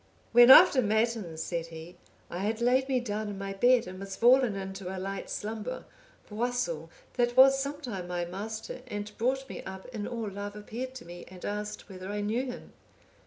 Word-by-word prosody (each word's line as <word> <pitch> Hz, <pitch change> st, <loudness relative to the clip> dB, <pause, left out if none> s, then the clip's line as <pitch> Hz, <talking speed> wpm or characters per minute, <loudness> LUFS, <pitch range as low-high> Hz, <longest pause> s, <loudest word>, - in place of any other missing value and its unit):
"When 240 Hz, +1 st, +8 dB
after 280 Hz, -2 st, +9 dB
matins," 220 Hz, -6 st, 0 dB
said 170 Hz, -1 st, -3 dB
he, 165 Hz, +2 st, -10 dB, 0.4 s
"I 175 Hz, -, -4 dB
had 215 Hz, +3 st, -1 dB
laid 255 Hz, +3 st, +2 dB
me 260 Hz, -2 st, +2 dB
down 215 Hz, -3 st, -3 dB
in 200 Hz, -, -6 dB
my 195 Hz, 0 st, -4 dB
bed, 245 Hz, +4 st, +4 dB
and 185 Hz, +1 st, -8 dB
was 195 Hz, 0 st, -6 dB
fallen 245 Hz, -2 st, +4 dB
into 190 Hz, -1 st, -6 dB
a 190 Hz, -, -5 dB
light 195 Hz, +1 st, -5 dB
slumber, 220 Hz, +3 st, -4 dB, 0.4 s
Boisil, 245 Hz, -, -2 dB, 0.3 s
that 240 Hz, 0 st, +1 dB
was 270 Hz, +1 st, +8 dB
sometime 270 Hz, -, -4 dB
my 175 Hz, -1 st, -2 dB
master 215 Hz, +7 st, -6 dB
and 205 Hz, -2 st, -6 dB
brought 265 Hz, +3 st, 0 dB
me -, -, -7 dB
up 190 Hz, 0 st, -8 dB
in 220 Hz, -5 st, -5 dB
all 230 Hz, -3 st, -4 dB
love, 205 Hz, +1 st, -6 dB
appeared 240 Hz, +5 st, -6 dB
to 255 Hz, -, -9 dB
me, 175 Hz, +1 st, -10 dB
and 185 Hz, -1 st, -10 dB
asked, 210 Hz, 0 st, -4 dB
whether 185 Hz, -1 st, -8 dB
I 205 Hz, 0 st, -2 dB
knew 220 Hz, +5 st, 0 dB
him? 245 Hz, -, -8 dB
210 Hz, 190 wpm, -29 LUFS, 195-245 Hz, 0.4 s, after